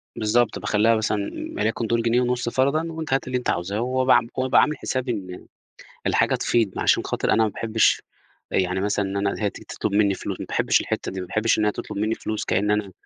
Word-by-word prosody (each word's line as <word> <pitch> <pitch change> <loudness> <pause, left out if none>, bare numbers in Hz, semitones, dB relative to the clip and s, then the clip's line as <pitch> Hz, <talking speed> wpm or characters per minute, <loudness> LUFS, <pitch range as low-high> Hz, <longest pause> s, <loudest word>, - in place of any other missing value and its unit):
بالضبط، 110 -1 +1
باخلّيها 105 +3 +2
مثلًا 110 -1 0 0.4
وليكن 110 +2 -1
دول 115 +1 +1
جنيه 120 +2 +2
ونص 125 -1 0
فرضًا 140 +6 +1
وأنتِ 160 -3 -4
هاتي 135 - 0
اللي 130 0 0
أنتِ 125 - -3
عاوزاه، 100 +4 -1
وأبقى 130 +1 +3
عام 115 - +2
وأبقى 130 0 +4
عامل 150 0 +1
حسابي 130 -1 -2
إن 95 -5 -6 0.6
الحاجة - - +2
تفيض، 110 -5 0
عشان - - +3
خاطر - - -1
أنا 110 - +4
ما 110 - +1
باحبش 110 +1 +1 0.5
يعني 95 0 0
مثلًا 105 0 0
إن 95 +1 -3
أنا 100 0 0
هي 105 - +2
تيجي - - -13
تطلب - - -3
مني 100 -1 +3
فلوس، - - -5
ما - - -5
باحبش - - +2
الحتة - - -3
دي، 95 0 -5
ما 90 - -7
باحبش 110 +4 +1
إن 105 - +2
هي 105 - +2
تطلب - - -7
مني 110 +2 0
فلوس 110 -1 -4
كأن 105 +2 +1
أنا 105 -2 -1
110 Hz, 220 wpm, -23 LUFS, 100-125 Hz, 0.6 s, وأبقى